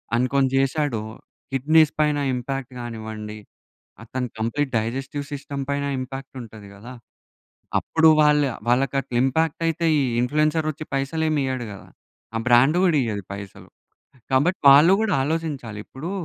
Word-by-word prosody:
అనుకోని 130 +2 +2
చేశాడొ. 135 -3 0 0.5
కిడ్నీస్ 150 +3 +4
పైన 150 -1 +2
ఇంపాక్ట్ 130 +1 -4
కానివ్వండి, 110 -2 -7 0.7
అతను 125 +2 -4
కంప్లీట్ 130 +5 -1
డైజెస్టివ్ 135 +6 -4
సిస్టమ్ 140 -1 -5
పైన 140 0 -1
ఇంపాక్ట్ 135 +1 -7
ఉంటది 110 -3 -12
కదా! 110 +5 -11 0.9
అప్పుడు 160 0 +3
వాళ్ళ 150 0 +4 0.3
వాళ్ళకి 125 +2 +2
అట్లా 125 - -6
ఇంపాక్ట్ 160 +4 0
అయితే 165 +1 -1
ఈ - - +2 0.2
ఇన్‌ఫ్లుయెన్సర్ 150 +4 +1
వచ్చి 155 +1 -7
పైసలు 140 +4 -1
ఏమి 155 -2 +1
ఇయ్యడు 130 -2 -3
కదా. 100 - -12 0.5
ఆ - - +1
బ్రాండ్ 125 +7 +5
కూడా 170 -4 +3
ఇయ్యదు 105 -5 -3
పైసలు. 100 -1 -10 0.6
కాబట్టి 170 +9 +2
వాళ్ళు 150 +6 +7
కూడా 215 -5 +1
ఆలోచించాలి. 145 -8 -3
ఇప్పుడు 155 +7 -7
135 Hz, 135 wpm, -23 LUFS, 120-150 Hz, 0.9 s, వాళ్ళు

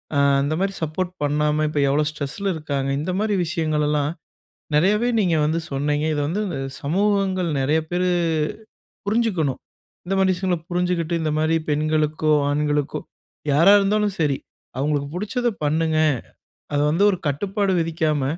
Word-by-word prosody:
அ - - +2 0.2
அந்த 145 +3 0
மாதிரி 195 0 -1
சப்போர்ட் 175 +4 -2
பண்ணாம, 150 +1 +1
இப்ப 150 - -1
எவ்ளோ 150 +2 +2
ஸ்ட்ரெஸ்ல 150 +7 -4
இருக்காங்க. 140 -3 -2
இந்த 165 - -2
மாதிரி 215 -1 +1
விஷயங்களெல்லாம், 150 -3 0 0.6
நெறையவே 210 +9 +3
நீங்க 175 -4 +2
வந்து 160 +2 0
சொன்னீங்க. 145 +2 0
இத - - -1
வந்து 185 +7 -1 0.4
சமூகங்கள் 190 +2 +1
நெறைய 150 +4 +2
பேரு 180 +1 +1 1.0
புரிஞ்சுக்கணும். 200 - 0 0.5
இந்த 185 - -2
மாரி 190 -1 +3
விஷயங்கள 180 0 -1
புரிஞ்சுகிட்டு, 175 -1 0
இந்த 155 -1 0
மாதிரி 155 +1 +2
பெண்களுக்கோ, 155 +1 +1 0.2
ஆண்களுக்கோ 150 0 0 0.5
யாரா 165 +7 +6
இருந்தாலும் 205 0 +1
சரி 145 -4 +1 0.4
அவங்களுக்கு, 145 +1 0
"புடிச்சத 215 +6 -1 0.2
பண்ணுங்க" 160 +1 +1 0.8
அத 145 - +2
வந்து 170 +6 +2
ஒரு 185 - -2
கட்டுப்பாடு 195 +7 0
விதிக்காம, 160 -3 0
160 Hz, 135 wpm, -22 LUFS, 150-190 Hz, 1.0 s, யாரா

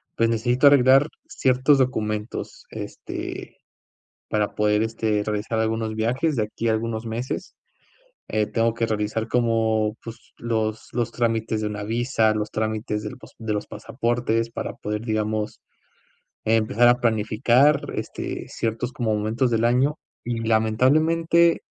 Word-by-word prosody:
Pues, 115 0 +2
necesito 120 +5 +3
arreglar 135 +1 +6 0.2
ciertos 130 +2 +3
documentos, 110 -4 -2
este, - - -7 0.7
para 105 -1 0
poder 105 0 +2
este, 110 -2 0
realizar 105 +2 -2
algunos 110 0 -1
viajes 125 +8 0
de 110 - +1
aquí 110 +2 -3
a - - +3
algunos 110 +1 -2
meses. 115 +3 -4 0.7
Eh, 110 -1 +1
tengo 115 0 +1
que 115 - 0
realizar, 110 0 -2
como 110 -2 +1
pues, 115 0 -11
los 110 -2 -2
los 120 -2 -1
trámites 115 -2 0
de 105 - -2
una 105 -1 -5
visa, 115 -1 +1
los 105 0 -2
trámites 110 -1 -2
del 105 - -6
pos - - -15
de 110 -2 -3
los 105 - -2
pasaportes, 115 -1 -1
para - - -4
poder, 105 +1 -4
digamos, 110 -1 -2 0.8
empezar 115 +2 +3
a 120 +1 +4
planificar, 120 +5 +3
este, - - -5
ciertos 115 +2 -3
como 115 -4 -1
momentos 110 +4 0
del 115 0 +1
año, 130 +5 +2 0.3
y 120 -1 -2
lamentablemente 155 +10 +3
115 Hz, 140 wpm, -24 LUFS, 110-120 Hz, 0.8 s, arreglar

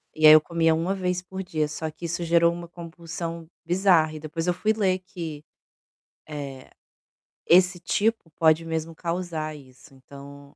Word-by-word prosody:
e 155 0 +6
aí 155 - +11
eu 155 - +9
comia 165 0 +1
1 170 +4 -1
vez 180 -1 -2
por 190 +1 -7
dia, 155 -4 -1
só 155 +2 -4
que 155 +3 -9
isso 170 +1 -2
gerou 170 0 +3
uma 170 0 -8
compulsão 170 -1 -7 0.2
bizarra 175 -3 +3
e 155 - -7
depois 160 +2 -4
eu 180 - +2
fui 210 +5 0
ler 190 -4 +1
que, 165 -5 -8 0.8
eh, 140 -4 -7 0.8
esse 180 0 +5
tipo 205 +1 -1
pode 160 0 +3
mesmo 160 0 -4
causar 165 -3 -4
isso, 135 0 -16
então 140 +1 -14
165 Hz, 165 wpm, -25 LUFS, 155-180 Hz, 0.8 s, aí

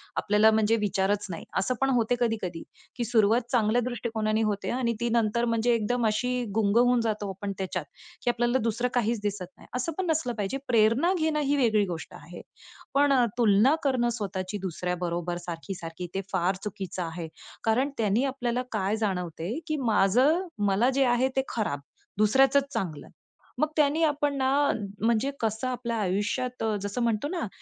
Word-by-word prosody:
आपल्याला 210 +1 +4
म्हणजे 220 0 +3
विचारच 205 -1 0
नाही. 170 - -6
असं 250 +7 +1
पण 270 - +3
होते 245 -2 +2
कधी-कधी 215 -8 -2 0.3
की 240 - -2
सुरुवात 225 0 +3
चांगल्या 235 -1 +3
दृष्टिकोनाने 225 -3 -1
होते 210 -2 -1
आणि 240 -2 0
ती 235 0 0
नंतर 230 0 +1
म्हणजे 230 +1 +2
एकदम 230 +1 0
अशी 250 +3 0
गुंग 215 -1 +2
होऊन 245 0 +4
जातो 215 -3 -2
आपण 195 +1 -5
त्याच्यात, 190 -1 -3 0.4
की 245 - +1
आपल्याला 240 +1 +1
दुसरं 230 +2 0
काहीच 230 -2 0
दिसत 205 -2 -2
नाही. - - -16
असं 250 +6 -1
पण 380 - -1
नसलं 300 -6 0
पाहिजे. 205 +6 -2
प्रेरणा 230 - +3
घेणं 315 -4 0
ही 290 -1 +1
वेगळी 220 -6 +3
गोष्ट 170 -4 -6
आहे, 170 +4 -10 0.5
पण 280 0 +4
अ, 250 -2 +4
तुलना 230 +5 +5
करणं 255 -4 +2
स्वतःची 195 -3 -4
दुसऱ्याबरोबर 175 -1 -3
सारखी-सारखी, 175 0 -6
ते 195 - -1
फार 185 0 +1
चुकीचं 190 -3 -5
आहे. 165 0 -5 0.4
कारण 245 +5 +2
त्यानी 220 +2 +2
आपल्याला 250 -2 -1
काय 205 -1 0
जाणवते, 180 - -2
की 310 - 0
माझं 255 - +3 0.2
मला 200 +6 +3
जे 275 - +3
आहे 245 +1 +3
ते 265 - +3
खराब, 205 -11 -2 0.4
दुसऱ्याचचं 265 +7 +5
चांगलं. 185 - -4 0.5
मग 305 - +2
त्यानी 300 +2 +3
आपण 290 -2 +1
ना 260 0 +1 0.6
म्हणजे 235 +4 +2
कसं 220 +2 -1
आपल्या 240 -2 -3
आयुष्यात 210 +7 -1
अ, 220 -1 +1
जसं 205 +4 -3
म्हणतो 230 +3 0
ना, 345 -9 -2
225 Hz, 165 wpm, -27 LUFS, 200-250 Hz, 0.6 s, तुलना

